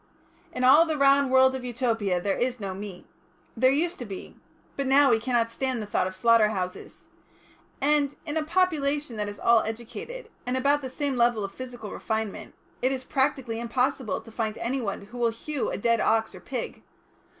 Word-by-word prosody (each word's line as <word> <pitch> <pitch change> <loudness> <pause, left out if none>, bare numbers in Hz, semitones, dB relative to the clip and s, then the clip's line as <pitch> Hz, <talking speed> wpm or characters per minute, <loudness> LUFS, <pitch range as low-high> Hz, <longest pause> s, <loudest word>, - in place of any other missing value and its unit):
"In 250 - -3
all 270 +6 +8
the 320 -2 -2
round 275 -1 +4
world 260 0 +5
of 260 - -5
Utopia 230 -6 0
there 195 +2 0
is 250 0 -1
no 195 -2 -4
meat. 195 -1 -8 0.5
There 255 +2 +4
used 330 +6 0
to 245 - -5
be. 195 -3 -8 0.4
But 275 -1 -2
now 275 0 +5
we 225 - +4
cannot 235 -1 +1
stand 260 0 -2
the 215 - -4
thought 205 -2 0
of 185 - -7
slaughter 230 +2 +5
houses. 185 -4 -5 0.7
And, 290 0 +2
in 295 -1 -4
a 320 - +2
population 300 -6 0
that 210 -1 -2
is 205 - -9
all 235 -1 +5
educated, 240 - -6
and 250 +1 -1
at - - +1
about 285 +2 +3
the 260 - -5
same 275 0 -2
level 235 -3 +3
of 195 - -4
physical 245 -5 -8
refinement, 220 -2 -4 0.3
it 255 - +2
is 260 -1 -3
practically 265 -4 0
impossible 250 -2 -1
to 225 - -14
find 220 -1 -3
anyone 235 -5 -3
who 245 +4 -10
will 235 -1 +3
hew 265 +5 -3
a - - -3
dead 230 +2 +2
ox 220 0 +1
or - - -10
pig. - - -5
245 Hz, 195 wpm, -26 LUFS, 220-275 Hz, 0.7 s, all